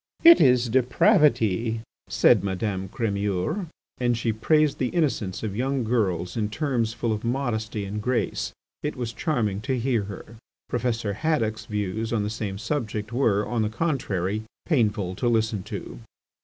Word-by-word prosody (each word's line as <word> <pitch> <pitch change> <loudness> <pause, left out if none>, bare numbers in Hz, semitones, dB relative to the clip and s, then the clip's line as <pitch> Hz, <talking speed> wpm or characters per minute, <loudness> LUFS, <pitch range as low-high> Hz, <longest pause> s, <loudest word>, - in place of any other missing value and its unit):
"It 335 0 +9
is 125 -3 +5
depravity!" 115 -3 +3 0.3
said - - +4
Madame 95 0 -2
Crémeur. 105 - -1 0.3
And 120 -2 +1
she 115 -1 0
praised 150 +6 +2
the 130 - +1
innocence 125 - -1
of 105 -3 -3
young 130 +2 0
girls 95 -7 0
in 105 -2 -1
terms 120 -3 0
full 115 0 -1
of 105 - -4
modesty 110 -4 -2
and 105 +2 -4
grace. 125 +2 -1 0.3
It 150 - -3
was 120 -3 -4
charming 110 -6 -1
to 130 +3 -1
hear 120 -4 0
her. 105 +3 -9 0.3
Professor 115 -3 -1
Haddock's 115 -5 -1
views 105 +2 -2
on 110 -3 +1
the 105 - -2
same 105 -3 -4
subject 110 -2 -3
were, 105 -5 +2
on 120 -2 0
the 105 - +1
contrary, 110 - -1 0.2
painful 105 - +1
to 120 - 0
listen 110 -3 +1
to. 105 -2 -7
110 Hz, 155 wpm, -25 LUFS, 105-125 Hz, 0.3 s, It